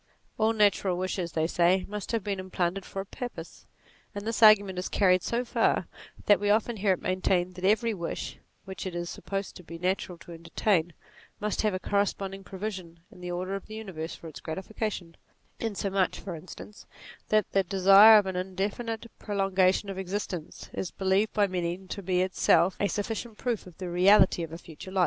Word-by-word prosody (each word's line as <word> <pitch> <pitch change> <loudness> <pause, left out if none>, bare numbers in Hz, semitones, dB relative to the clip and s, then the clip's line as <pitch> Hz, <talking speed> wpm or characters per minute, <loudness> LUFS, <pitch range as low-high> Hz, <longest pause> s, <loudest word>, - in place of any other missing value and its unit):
All 220 +1 +4
natural 200 -4 +2
wishes, 185 -2 -3
they 160 -1 +1
say, 175 +2 +2
must 210 -1 -5
have 230 -4 -1
been 200 -2 -2
implanted 185 0 -2
for 195 - -5
a - - -8
purpose: 200 -7 -8 0.5
and 205 0 -5
this 230 +1 -2
argument 205 -4 +6
is 180 - -3
carried 185 -2 +3
so 235 +6 -1
far, - - +1 0.4
that 205 - +5
we 205 0 0
often 220 +2 +2
hear 195 -1 +3
it 180 - -6
maintained 185 -1 0
that 180 +1 -5
every 220 +3 +3
wish, 170 -4 -5 0.3
which 190 0 -6
it 180 - -6
is 175 0 -3
supposed 195 -1 -5
to 180 - -13
be 165 0 -9
natural 180 0 -2
to 170 - -13
entertain, 170 +1 0 0.5
must 210 0 -1
have 215 -3 +1
a - - -2
corresponding 195 -1 -1
provision 190 -4 -6
in 180 - -15
the 180 - -5
order 180 +2 -3
of 195 - -5
the 215 - -8
universe 180 -7 -6
for 165 - -11
its 155 - -9
gratification: 190 0 -5 0.4
insomuch 195 -4 -1
(for 190 - -6
instance) 185 +5 -11 0.4
that 215 -2 +2
the 195 - +3
desire 195 +3 +8
of 205 - +3
an 190 -1 -3
indefinite 200 +5 -3
prolongation 195 -1 +1
of 195 -1 -5
existence, 185 -3 -5
is 185 - -3
believed 195 +3 +1
by 205 -2 +3
many 175 -2 -2
to 190 +1 -7
be 180 -1 +1
in - - +3
itself 185 0 +3
a 205 - +2
sufficient 220 +2 -4
proof 235 -6 -2
of 175 - -14
the 185 - -5
reality 180 +1 +5
of 165 -2 -5
a 165 - -6
future 170 +2 -11
life. 190 - -1
190 Hz, 195 wpm, -28 LUFS, 180-205 Hz, 0.5 s, desire